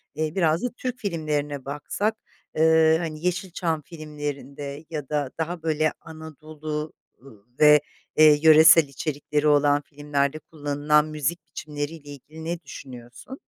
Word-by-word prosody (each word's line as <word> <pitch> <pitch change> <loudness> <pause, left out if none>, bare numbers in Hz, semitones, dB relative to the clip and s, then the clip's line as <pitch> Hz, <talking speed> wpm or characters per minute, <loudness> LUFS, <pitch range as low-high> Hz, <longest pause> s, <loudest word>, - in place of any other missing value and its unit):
Eee, 155 +1 -2
biraz 165 -1 +1
da 250 - 0
Türk 250 -1 -4
filmlerine 150 - -3
baksak, 150 +10 -2 0.4
eee, 160 0 +5
hani, 160 -1 -5
Yeşilçam 180 -3 -2
filmlerinde 145 -1 -7
ya 150 -4 -6
da 145 -3 -1
daha 165 +1 -3
böyle 155 -1 +1
Anadolu 155 -1 -7 0.7
ve, 150 -1 +7 0.4
eee, 155 -1 +7
yöresel 160 +1 +8
içerikleri 145 +1 -2
olan 145 0 +4
filmlerde 145 0 -2
kullanılan 150 0 0
müzik 155 +2 -3
biçimleriyle 150 0 -6
ilgili 150 +3 -11
ne 170 +1 -3
düşünüyorsun? 125 - -11
155 Hz, 120 wpm, -24 LUFS, 145-160 Hz, 0.7 s, yöresel